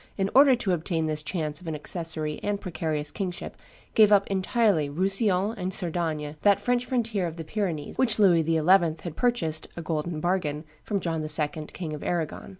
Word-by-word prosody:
in 195 0 0
order 275 -1 +7
to 220 -5 -2
obtain 165 -1 -1
this 155 -1 -2
chance 155 -1 -3
of 175 - -11
an 160 - -2
accessary 155 -1 -3
and 205 -1 -1
precarious 160 -5 -3
kingship, 185 -4 -5 0.4
gave 215 -2 +6
up 200 -1 +5
entirely 195 -5 +2
Roussillon 195 +4 +1
and 180 +1 -2
Cerdagne, 160 -4 -2
that 200 -2 +4
French 245 0 0
frontier 225 -7 -1
of 165 - -6
the 165 - -5
Pyrenees 165 -4 -3
which 230 -4 +3
Louis 180 -6 +5
XI. 165 +1 +1 0.5
had 170 -4 -6
purchased, 235 -11 0
a 170 - -5
golden 155 0 -2
bargain, 155 -4 -1 0.2
from 200 -3 -2
John 165 -2 -2
II., 155 0 0
King 165 -4 -6
of 150 - -6
Arragon. 170 -3 -3
175 Hz, 180 wpm, -26 LUFS, 155-200 Hz, 0.5 s, order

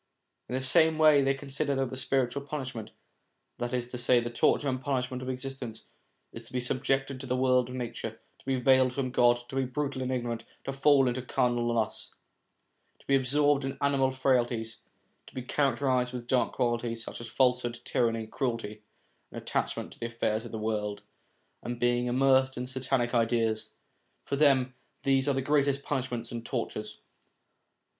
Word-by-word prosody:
In 125 - -2
the 130 - -1
same 160 +4 +5
way 155 -2 +6
they 135 0 +2
consider 140 +1 -2
that 135 -2 -1
the - - -4
spiritual 135 +1 0
punishment, 135 -6 -5 0.7
that 120 0 -2
is 125 -1 -1
to 125 - -4
say 120 0 +5
the 120 0 -4
torture 140 +4 +2
and 130 -1 -1
punishment 130 -1 -2
of 130 - -5
existence, 130 -3 -6 0.5
is 115 - -7
to 125 - -16
be 125 - 0
subjected 135 +2 -1
to 135 - -6
the 125 - 0
world 125 -1 +3
of 125 - -6
nature, 115 -2 -5 0.2
to - - -23
be 135 - +2
veiled 130 0 +4
from 130 -1 -2
God, 120 -1 +4
to - - -8
be 135 - +1
brutal 140 +1 -3
and 130 0 -2
ignorant, 120 -2 -2 0.2
to 135 - -4
fall 135 -1 +4
into 125 +1 -1
carnal 120 -1 0
lusts, 115 -2 -2 0.8
to - - -24
be 140 - +3
absorbed 145 +2 +2
in 135 0 -4
animal 140 -2 +2
frailties; 120 -4 0 0.5
to - - -15
be 130 - -4
characterised 130 -2 +1
with 120 -1 -5
dark 125 0 +1
qualities, 120 -2 -1
such - - -7
as 120 - -6
falsehood, 125 -1 +1
tyranny, 115 -2 0
cruelty, 115 -3 -3 0.5
attachment - - -3
to - - -18
the 115 - -2
affairs 115 -1 -1
of 120 - -8
the 110 - -4
world, 105 -1 -2 0.6
and 120 0 -5
being 120 0 +1
immersed 130 +1 +3
in 125 - -3
satanic 130 -1 -1
ideas; 115 -2 +1 0.5
for 140 - -1
them, 135 -3 +3 0.3
these 135 0 +2
are 140 - +1
the 135 - -1
greatest 140 -1 +2
punishments 125 -4 -3
and 120 -1 -5
tortures. - - -4
125 Hz, 180 wpm, -29 LUFS, 120-135 Hz, 0.8 s, way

